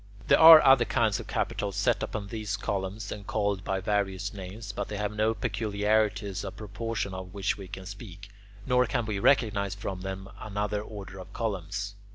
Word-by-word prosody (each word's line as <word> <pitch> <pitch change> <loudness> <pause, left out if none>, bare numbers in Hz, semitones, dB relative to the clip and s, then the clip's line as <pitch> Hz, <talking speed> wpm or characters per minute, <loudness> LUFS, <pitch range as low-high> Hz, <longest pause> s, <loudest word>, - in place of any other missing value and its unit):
There - - +6
are 160 -1 +11
other 135 -2 +7
kinds 115 -4 +1
of - - -8
capitals 100 -2 -2
set 100 - +1
upon 105 -2 -3
these 110 -1 -5
same 100 - -4
columns 100 +1 -3
and 100 -1 -7
called 100 -2 -1
by 95 0 -2
various 100 0 -1
names, 100 +2 -7
but 100 0 -4
they 105 - -5
have 105 0 -2
no 110 +1 +1
peculiarities 105 -2 0
of 95 - -6
proportion 105 -1 -4
of 95 0 -8
which 100 -1 0
we 100 -2 -9
can 95 0 -8
speak, 100 -1 -10 0.4
nor 125 0 +3
can 115 - -1
we 105 -2 -2
recognize 100 -6 +2
from 95 -2 -5
them 95 0 -5
another 105 0 -2
order 100 -2 -9
of 95 - -10
columns. 100 -2 -3
100 Hz, 190 wpm, -28 LUFS, 95-110 Hz, 0.4 s, are